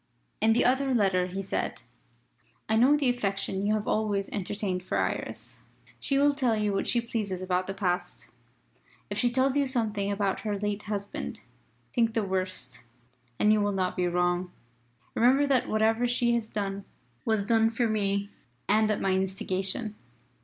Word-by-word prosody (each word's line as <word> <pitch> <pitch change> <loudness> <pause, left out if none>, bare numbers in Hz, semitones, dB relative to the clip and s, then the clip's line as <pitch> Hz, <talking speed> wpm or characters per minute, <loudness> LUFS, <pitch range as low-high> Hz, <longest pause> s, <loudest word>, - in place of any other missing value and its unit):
In 220 +1 +5
the 235 - +3
other 265 +1 +2
letter 190 -4 +2
he 190 +2 -4
said: 195 - -3 0.8
"I 220 - +2
know 260 +6 +5
the 285 -3 +1
affection 200 -3 -2
you 215 - +3
have 215 -1 -3
always 205 -2 0
entertained 195 -1 -2
for 180 - -2
Iris. - - -3 0.4
She 275 - 0
will 285 +1 +4
tell 255 -5 +1
you 210 -1 0
what 195 - -1
she 240 - +2
pleases 205 -6 -3
about 185 0 0
the 195 - -4
past. 180 -3 -2 0.8
If - - -1
she 245 - +3
tells 260 +2 +1
you 285 -1 +2
nothing 210 -4 0
about 200 -1 0
her 210 -2 -2
late 205 0 -2
husband, 200 -1 -4 0.5
think 230 -2 +2
the 225 - +2
worst 185 -10 -3 0.6
and 210 0 +4
you 215 - +3
will 205 0 +1
not 185 -1 -1
be 180 -1 +1
wrong. 175 +1 0 0.6
Remember 260 +5 +4
that 270 -3 +1
whatever 225 +2 +2
she 240 0 +2
has 230 -2 -1
done 200 -1 -3 0.4
was 220 -3 +1
done 225 0 +4
for 230 +1 0
me 200 -2 0 0.4
and 215 +1 +3
at 215 - 0
my 195 - +1
instigation. 190 +2 -1
210 Hz, 170 wpm, -28 LUFS, 195-230 Hz, 0.8 s, In